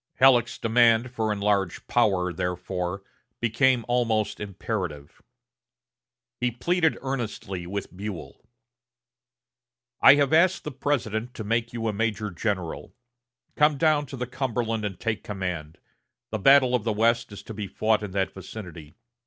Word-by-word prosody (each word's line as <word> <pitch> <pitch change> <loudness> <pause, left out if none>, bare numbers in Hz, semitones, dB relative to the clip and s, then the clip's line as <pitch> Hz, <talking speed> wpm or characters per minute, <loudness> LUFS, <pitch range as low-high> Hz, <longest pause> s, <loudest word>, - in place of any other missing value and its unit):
Halleck's 125 -3 +4
demand 115 +1 +3
for 110 -3 -1
enlarged 100 -3 0
power, 95 -7 +2
therefore, 90 +2 -3 0.4
became 120 +1 +2
almost 115 -3 0
imperative. 95 - -5 1.2
He 125 - +1
pleaded 160 +7 +1
earnestly 110 -9 -4
with 100 0 -5
Buell: 95 -4 -7 1.6
"I - - +9
have 145 0 +2
asked 175 +3 +4
the 150 - -5
President 125 -4 -2
to 110 - -5
make 115 +2 -1
you 115 -1 -3
a 110 - 0
major 105 -1 -1
general. 90 -2 -3 0.6
Come 150 -1 +4
down 150 -1 +2
to 135 - -8
the 125 - -2
Cumberland 120 -3 -2
and 95 -4 -5
take 110 -2 -2
command. 90 -6 -5 0.5
The 110 - -2
battle 130 +2 +6
of 125 -4 +1
the 115 - 0
West 115 +2 +1
is 100 - -9
to 110 - -8
be 105 -1 -5
fought 110 +2 +1
in 105 - -5
that 95 0 -1
vicinity.... 90 -6 -10
110 Hz, 140 wpm, -26 LUFS, 100-125 Hz, 1.6 s, I